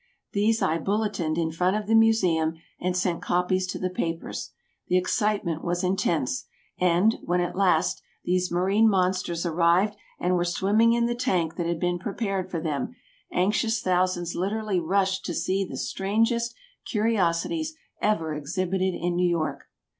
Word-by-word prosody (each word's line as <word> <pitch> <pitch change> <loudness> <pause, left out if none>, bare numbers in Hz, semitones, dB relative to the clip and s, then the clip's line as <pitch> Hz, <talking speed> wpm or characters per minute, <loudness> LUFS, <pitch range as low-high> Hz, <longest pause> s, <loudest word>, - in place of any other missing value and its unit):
These 220 +2 +2
I 160 +2 +1
bulletined 195 -5 -1
in 165 -1 0
front 180 +4 +1
of 215 - -4
the 220 - 0
Museum 185 -8 +3 0.2
and 180 0 -1
sent 180 -2 0
copies 180 +1 +1
to 185 - -4
the 185 -1 -2
papers. 165 -2 -3 0.4
The 180 - +3
excitement 190 -3 0
was 175 +1 -1
intense, 170 -8 0 0.3
and, 180 +5 +3
when 180 +1 0
at 175 - -1
last, 180 -3 +2 0.2
these 180 0 +1
marine 195 +5 +3
monsters 185 -3 0
arrived 170 +5 +3 0.2
and 180 +1 +1
were 175 - +2
swimming 205 +6 +3
in 235 0 +2
the 240 - 0
tank 180 -9 0
that 170 -2 -1
had 170 -1 -1
been 175 0 0
prepared 195 -1 -2
for 170 - -2
them, 155 - -3 0.4
anxious 210 +4 +1
thousands 180 -3 0
literally 200 +1 -1
rushed 190 +3 +1
to 175 - -3
see 195 +1 0
the 185 - -6
strangest 230 +4 0 0.3
curiosities 220 - 0 0.3
ever 165 -7 +1
exhibited 185 +5 -1
in 175 +1 -1
New 180 0 +2
York. 155 -5 -2
185 Hz, 155 wpm, -26 LUFS, 170-205 Hz, 0.4 s, Museum